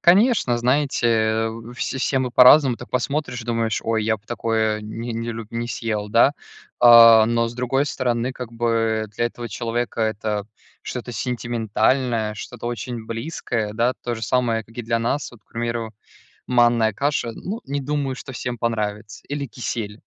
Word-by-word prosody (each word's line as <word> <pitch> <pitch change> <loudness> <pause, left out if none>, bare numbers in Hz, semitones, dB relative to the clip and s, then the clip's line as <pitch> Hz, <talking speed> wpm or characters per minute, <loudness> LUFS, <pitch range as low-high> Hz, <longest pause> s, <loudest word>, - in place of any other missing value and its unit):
Конечно, 195 - +4
знаете 115 -4 +1 0.3
все 130 - -3
се 135 +1 +1
мы 130 -1 -1
по-разному 125 +1 +7
так 120 - -11
посмотришь 125 -1 -2
думаешь: 115 -2 -1
"Ой 110 -1 0
я 110 0 +1
бы 100 - -26
такое 110 -2 0
не 115 +3 -6
не 115 +1 -3
люб 110 -1 -8
не 115 0 -3
съел", 110 -3 -3
да, 115 +5 +5 0.5
э, 115 -2 +9
но 115 0 +1
с 115 - -9
другой 125 +3 0
стороны 125 -2 -1
как 125 -2 -8
бы 115 -2 0
для 120 - +1
этого 120 0 -7
человека- 115 +2 -3
это 105 -1 -2 0.4
что-то 125 -1 -6
сентиментальное 115 -1 0
что-то 105 - -8
очень 120 0 -4
близкое, 115 -3 -3
да. 120 +3 +1
То 120 - -2
же 110 - -8
самое 115 -2 +1
как 115 +2 -20
и 120 - -3
для 115 0 0
нас, 135 +5 -1
вот 120 - -16
к - - -57
примеру, 115 -1 -3 0.6
манная 120 -2 +3
каша. 140 +1 -1
Ну, 205 - -6
не 140 +1 -3
думаю 140 -1 -2
что 135 - -9
всем 120 -1 -4
понравится 105 -2 -3
или 145 0 -3
кисель. 110 -3 -5
115 Hz, 165 wpm, -22 LUFS, 110-125 Hz, 0.6 s, э